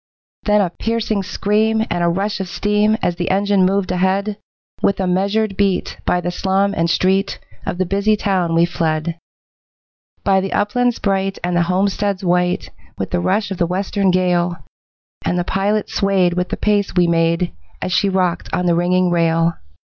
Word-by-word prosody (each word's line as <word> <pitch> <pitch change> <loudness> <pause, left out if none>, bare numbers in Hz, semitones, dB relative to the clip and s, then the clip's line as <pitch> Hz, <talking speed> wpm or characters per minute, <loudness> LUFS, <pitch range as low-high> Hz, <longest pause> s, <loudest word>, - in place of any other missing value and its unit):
Then 210 -1 +4
a 180 -4 0
piercing 225 0 -1
scream 215 +3 +1
and 175 0 0
a - - +3
rush 195 +4 -1
of 190 -2 -4
steam 210 +2 +1
As 175 -1 0
the 175 - -2
engine 195 -1 +3
moved 195 -1 0
ahead, 190 +3 0 0.4
With 200 - +1
a 190 - 0
measured 200 +3 0
beat 195 -2 0
by 180 - +2
the 175 +1 -2
slum 195 +2 0
and 165 -2 +1
street 190 +3 +1 0.3
Of - - -2
the 185 - 0
busy 200 +4 +1
town 185 -5 0
we 165 +1 +5
fled, 165 -1 -2 1.0
By 195 -1 +3
the 195 - -3
uplands 240 +4 +1
bright 195 -1 -1
and 175 0 -1
the 175 - +3
homesteads 195 +1 0
white, 180 0 0 0.3
With - - -4
the - - +1
rush 145 - 0
of 190 - -4
the 170 - +2
western 195 +2 0
gale, 180 -1 +1 0.7
And 180 - 0
the 175 - +1
pilot 200 +3 0
swayed 190 -3 +1
with 180 +1 -2
the - - -3
pace 205 -3 0
we 180 -1 +4
made 170 +1 +1 0.3
As 180 - -3
she 195 +2 +2
rocked 185 -2 0
on 180 - -1
the 175 - +3
ringing 180 +1 +2
rail. 165 0 +2
190 Hz, 180 wpm, -19 LUFS, 175-200 Hz, 1.0 s, we